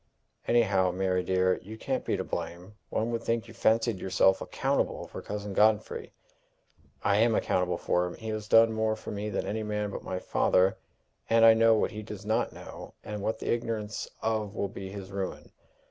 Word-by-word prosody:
"Anyhow, 100 -6 +3
Mary 90 0 0
dear, 95 0 +2
you 110 +4 -9
can't - - -2
be - - -1
to - - -2
blame! 90 +4 -5 0.2
One 115 +2 -1
would 115 -1 -2
think 115 0 -1
you 115 - -11
fancied 115 -2 +2
yourself 95 +1 +3
accountable - - -1
for - - -8
Cousin 105 -1 -5
Godfrey!" 110 +1 +2 0.9
"I 100 - +3
am 115 +1 +4
accountable 90 -1 +1
for 90 +1 +1
him. 90 - -7
He 110 -1 -7
has 110 -1 -4
done 115 +1 +6
more 110 0 +1
for 110 - -8
me 105 +1 -3
than 100 - -2
any 110 +2 -2
man 105 -1 -2
but - - -5
my 95 - -3
father; 90 +1 +2 0.5
and 115 0 +6
I 115 - +9
know 115 0 +5
what 110 - +1
he 110 - -6
does 105 -1 -9
not 110 +1 +1
know, - - -10
and 105 -1 -5
what 110 +2 -1
the - - -1
ignorance 115 -2 -3 0.2
of 110 -2 -1
will 100 - -1
be 95 0 -7
his 100 -1 -8
ruin. 95 -1 -5
105 Hz, 195 wpm, -29 LUFS, 95-110 Hz, 0.9 s, I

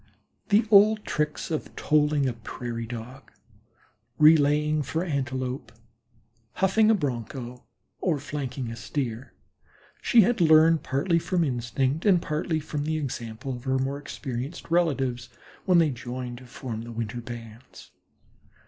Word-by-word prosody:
The 210 +2 +4
old 210 +1 +6
tricks 150 +2 -2
of 155 - -4
tolling 150 -2 +2
a 125 - -1
Prairie 115 0 -6
Dog, 120 +3 -9 0.9
relaying 150 0 +5
for 160 +5 -2
Antelope, 130 -4 -3 0.9
houghing 205 +3 +3
a 225 - +6
Bronco 125 - -4 0.3
or 170 -5 +1
flanking 135 -4 -5
a - - -6
Steer 120 +1 -4 0.7
she 235 - +6
had 225 0 +2
learned 160 0 +6
partly 165 +6 +1
from 175 +1 0
instinct 130 +2 -1
and 190 -4 +5
partly 155 0 -2
from 150 -1 -4
the 155 0 0
example 120 -3 -5
of 120 +2 -11
her 130 0 +1
more 135 +2 -2
experienced 140 +3 -6
relatives, 135 -8 +1 0.4
when 180 -2 +4
they 165 -3 +4
joined 125 0 -6
to 130 - -14
form 120 -3 -6
the 120 +1 -8
winter 115 +1 -4
bands. 120 0 -11
140 Hz, 135 wpm, -26 LUFS, 120-160 Hz, 0.9 s, old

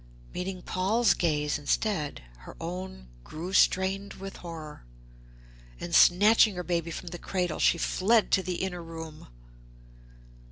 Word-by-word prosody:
Meeting 185 0 -5
Paul's 210 +5 +2
gaze 150 -3 0
instead, 150 - -1 0.2
her - - -12
own 175 - -6 0.2
grew 170 - -7
strained 195 +1 +2
with 195 0 -8
horror, 160 - -9 1.0
and 175 - -6
snatching 205 +5 +6
her 180 - -4
baby 170 -1 -1
from 170 +2 -6
the 175 - -8
cradle 180 -4 -2
she - - +4
fled 215 +6 +2
to 190 - +4
the 180 0 -3
inner 180 -2 -3
room. 160 -2 -9
180 Hz, 130 wpm, -28 LUFS, 165-190 Hz, 1.0 s, snatching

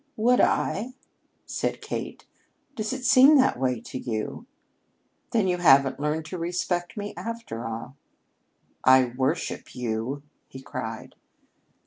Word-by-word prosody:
"Would 245 +3 +3
I?" 240 +6 0 0.5
said - - -2
Kate. - - -6 0.5
"Does 215 -3 -3
it 260 -1 -4
seem 275 +4 +7
that 260 - +3
way 125 -2 0
to 130 - -7
you? 115 - -4 0.8
Then 220 -5 +1
you 180 -1 +1
haven't 135 -5 +5
learned 150 +2 -1
to 175 +4 -6
respect 175 0 -2
me, 205 0 -4
after 230 - -5
all." 115 +4 -6 0.9
"I 130 -1 +6
worship 135 +5 -2
you," 125 +3 -3 0.2
he 130 - -10
cried. 130 - -6
160 Hz, 125 wpm, -26 LUFS, 130-215 Hz, 0.9 s, seem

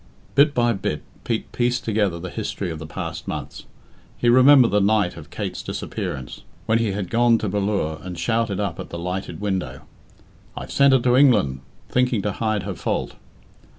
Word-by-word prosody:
Bit 140 +1 +4
by 120 -1 +3
bit 95 - -3 0.2
Pete 115 -2 -2
pieced 125 +1 0
together 105 -5 +1
the 90 +1 -6
history 85 - -4
of 80 - -6
the 80 - -7
past 75 - -6
months. - - -6 0.5
He 120 - +2
remembered 130 0 +7
the 105 0 +3
night 100 -2 +2
of 75 -3 -11
Kate's - - -4
disappearance, 65 -2 -5 0.2
when 115 +1 +2
he 110 -4 0
had 100 -2 -4
gone 115 0 +4
to 110 - -3
Ballure 100 -5 -1
and 90 -1 -7
shouted 110 -1 0
up 100 -5 -2
at - - -7
the - - -6
lighted 90 +3 -4
window, 100 -3 -3 0.8
"I've - - -6
sent 140 -1 +5
her 130 - +5
to 125 0 +3
England," 120 - +4 0.3
thinking 125 -5 +1
to 105 - 0
hide 110 -1 -1
her 100 0 -4
fault. - - -2
105 Hz, 185 wpm, -22 LUFS, 90-120 Hz, 0.8 s, remembered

